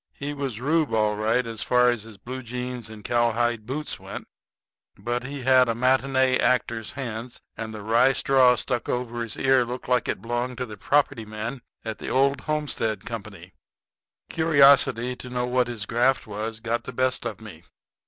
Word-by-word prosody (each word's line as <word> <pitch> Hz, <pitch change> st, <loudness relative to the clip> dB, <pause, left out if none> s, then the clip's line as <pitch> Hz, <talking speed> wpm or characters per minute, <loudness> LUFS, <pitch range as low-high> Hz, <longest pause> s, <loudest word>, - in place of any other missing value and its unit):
He 145 Hz, +1 st, -4 dB
was 135 Hz, -6 st, -4 dB
Reub 155 Hz, +2 st, +1 dB
all 105 Hz, -1 st, +2 dB
right 110 Hz, +4 st, +1 dB
as 115 Hz, -2 st, -4 dB
far 125 Hz, 0 st, +4 dB
as 120 Hz, -3 st, -3 dB
his 110 Hz, -1 st, -11 dB
blue 130 Hz, +5 st, -7 dB
jeans 125 Hz, -1 st, -5 dB
and 110 Hz, -1 st, -11 dB
cowhide 120 Hz, -1 st, +1 dB
boots 150 Hz, +4 st, -4 dB
went, -, -, -8 dB, 0.7 s
but 120 Hz, +1 st, -3 dB
he 140 Hz, 0 st, -6 dB
had 130 Hz, -1 st, +5 dB
a 115 Hz, -, 0 dB
matinee 130 Hz, +1 st, +2 dB
actor's 115 Hz, -2 st, 0 dB
hands, 120 Hz, -3 st, -6 dB, 0.2 s
and 110 Hz, -1 st, -5 dB
the 105 Hz, -1 st, -8 dB
rye 115 Hz, +5 st, +4 dB
straw 130 Hz, -2 st, +4 dB
stuck 125 Hz, 0 st, -1 dB
over 120 Hz, -1 st, -2 dB
his 115 Hz, -2 st, -4 dB
ear 130 Hz, -1 st, +4 dB
looked 125 Hz, +1 st, -6 dB
like 125 Hz, 0 st, +1 dB
it -, -, -1 dB
belonged 120 Hz, +3 st, -3 dB
to 125 Hz, -, -2 dB
the 110 Hz, -3 st, -9 dB
property 135 Hz, +2 st, +1 dB
man 110 Hz, +4 st, -6 dB, 0.2 s
of 110 Hz, -1 st, -5 dB
the -, -, -5 dB
Old 135 Hz, +1 st, +2 dB
Homestead 150 Hz, -8 st, -2 dB
Co. 115 Hz, -2 st, -4 dB, 1.1 s
Curiosity 140 Hz, -6 st, +4 dB
to 125 Hz, -, -8 dB
know 125 Hz, 0 st, -1 dB
what 125 Hz, 0 st, +1 dB
his 115 Hz, -4 st, -4 dB
graft 125 Hz, +4 st, +1 dB
was 110 Hz, +1 st, -5 dB
got 120 Hz, +1 st, -2 dB
the 125 Hz, -, -6 dB
best 130 Hz, +1 st, +1 dB
of 115 Hz, -5 st, -5 dB
me. 100 Hz, -7 st, -12 dB
125 Hz, 185 wpm, -25 LUFS, 115-130 Hz, 1.1 s, had